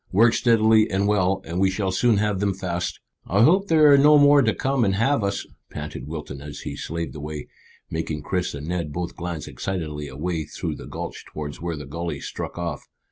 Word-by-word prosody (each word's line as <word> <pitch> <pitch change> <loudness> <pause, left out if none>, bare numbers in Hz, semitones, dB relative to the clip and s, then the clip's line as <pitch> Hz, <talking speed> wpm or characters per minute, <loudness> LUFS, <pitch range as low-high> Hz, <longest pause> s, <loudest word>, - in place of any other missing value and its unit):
"Work 115 +5 +5
steadily 110 -2 +4
and 95 +1 +1
well, 95 -2 +2
and 85 +3 -3
we 95 0 +4
shall 95 0 -1
soon 110 +3 +3
have 105 -2 0
them 100 -1 0
fast." 90 -2 -3 0.3
"I 100 +5 +3
hope 190 +9 +4
there 155 -3 +6
are 140 - +7
no 150 +2 +7
more 145 0 +7
to 110 -4 +3
come 135 +2 0
and 95 -3 +2
have 115 +3 +2
us," 100 0 -1 0.2
panted 75 -3 -6
Wilton 75 -3 -6
as 75 0 -8
he 70 -2 -5
slaved 85 +3 -4
away, 75 0 -6 0.4
making 80 -2 -3
Chris 90 -1 -2
and 70 +1 -6
Ned 85 -3 -2
both 85 +3 -4
glance 85 -2 -5
excitedly 80 -6 -4
away 80 +4 -3
through - - -5
the - - -9
gulch - - -6
towards 75 -1 -7
where 85 -1 -2
the 75 - -7
gully 85 +5 -4
struck - - -6
off. 85 -4 -4
90 Hz, 205 wpm, -24 LUFS, 75-110 Hz, 0.4 s, are